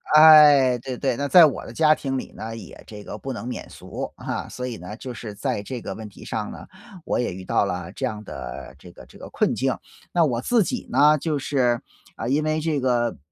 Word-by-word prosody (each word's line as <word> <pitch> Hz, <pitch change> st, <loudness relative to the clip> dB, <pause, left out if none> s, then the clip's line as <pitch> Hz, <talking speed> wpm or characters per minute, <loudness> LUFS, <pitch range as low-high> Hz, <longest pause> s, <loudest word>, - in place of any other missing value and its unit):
哎， 150 Hz, -5 st, +8 dB
对 125 Hz, 0 st, -6 dB
对， 135 Hz, -4 st, -1 dB
那 140 Hz, 0 st, -1 dB
在 175 Hz, +1 st, +8 dB
我 145 Hz, -, -1 dB
的 115 Hz, -, -9 dB
家 155 Hz, +1 st, +5 dB
庭 135 Hz, -3 st, -3 dB
里 -, -, -6 dB
呢， 115 Hz, +1 st, -7 dB
也 115 Hz, -, -11 dB
这 105 Hz, -1 st, -10 dB
个 105 Hz, -, -7 dB
不 135 Hz, +2 st, -5 dB
能 115 Hz, -, -7 dB
免 125 Hz, -, -6 dB
俗。 -, -, -7 dB
啊， -, -, -5 dB
所 125 Hz, -, -5 dB
以 120 Hz, -3 st, -5 dB
呢， 90 Hz, +5 st, -8 dB
就 125 Hz, +1 st, -7 dB
是 110 Hz, -3 st, -7 dB
在 100 Hz, 0 st, -2 dB
这 120 Hz, +2 st, -6 dB
个 -, -, -5 dB
问 110 Hz, -1 st, -8 dB
题 100 Hz, -, -14 dB
上 -, -, -4 dB
呢， -, -, -10 dB, 0.4 s
我 -, -, 0 dB
也 120 Hz, -7 st, -1 dB
遇 95 Hz, 0 st, -8 dB
到 100 Hz, -, +1 dB
了 90 Hz, -2 st, -4 dB
这 130 Hz, -, -3 dB
样 110 Hz, -3 st, -4 dB
的 65 Hz, -8 st, -8 dB
这 -, -, -13 dB
个 -, -, -14 dB
这 -, -, -17 dB
个 -, -, -9 dB
困 -, -, +1 dB
境。 -, -, 0 dB, 0.4 s
那 170 Hz, -2 st, +4 dB
我 120 Hz, -5 st, 0 dB
自 235 Hz, -, +3 dB
己 250 Hz, +6 st, -4 dB
呢， 150 Hz, +1 st, +5 dB
就 150 Hz, 0 st, -1 dB
是， 125 Hz, -4 st, +1 dB, 0.3 s
啊， 115 Hz, -, -5 dB
因 145 Hz, +4 st, +2 dB
为 155 Hz, 0 st, 0 dB
这 155 Hz, -3 st, 0 dB
个 120 Hz, -, 0 dB
125 Hz, 255 characters per minute, -23 LUFS, 110-150 Hz, 0.4 s, 哎